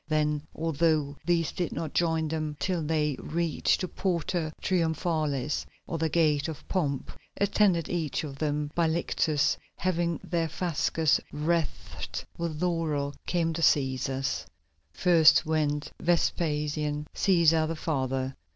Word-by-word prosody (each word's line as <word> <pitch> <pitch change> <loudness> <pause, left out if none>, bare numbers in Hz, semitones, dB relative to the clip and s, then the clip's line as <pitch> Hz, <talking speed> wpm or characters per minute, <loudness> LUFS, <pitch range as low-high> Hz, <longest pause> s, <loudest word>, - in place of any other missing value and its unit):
Then, 150 -1 +1
although 155 -2 +1
these 170 -3 +2
did 175 - -2
not 160 -3 -4
join 160 -2 +1
them 155 -1 -3
till 180 -3 0
they 150 -2 0
reached 165 0 0
the 185 - -1
Porta 170 -3 -1
Triumphalis, 160 -5 0 0.2
or 165 - -4
the 160 0 +1
Gate 150 -3 +2
of 160 -3 -7
Pomp, 145 -8 -1 0.3
attended, 200 -4 +3
each 160 -5 -2
of 140 -3 -7
them, 150 -1 -1
by 170 -1 +2
lictors 160 -2 +1 0.2
having 170 -3 0
their 165 -2 -1
fasces 160 -1 +1
wreathed 160 +2 -2
with 165 -3 -3
laurel, 155 -5 0
came 165 -2 +1
the 165 - -3
Cæsars. 135 - +1 0.4
First 165 - +5
went 150 -1 0
Vespasian 150 -3 0
Cæsar, 165 -4 +4
the 165 - -2
father. 135 -4 -2
160 Hz, 125 wpm, -28 LUFS, 150-170 Hz, 0.4 s, First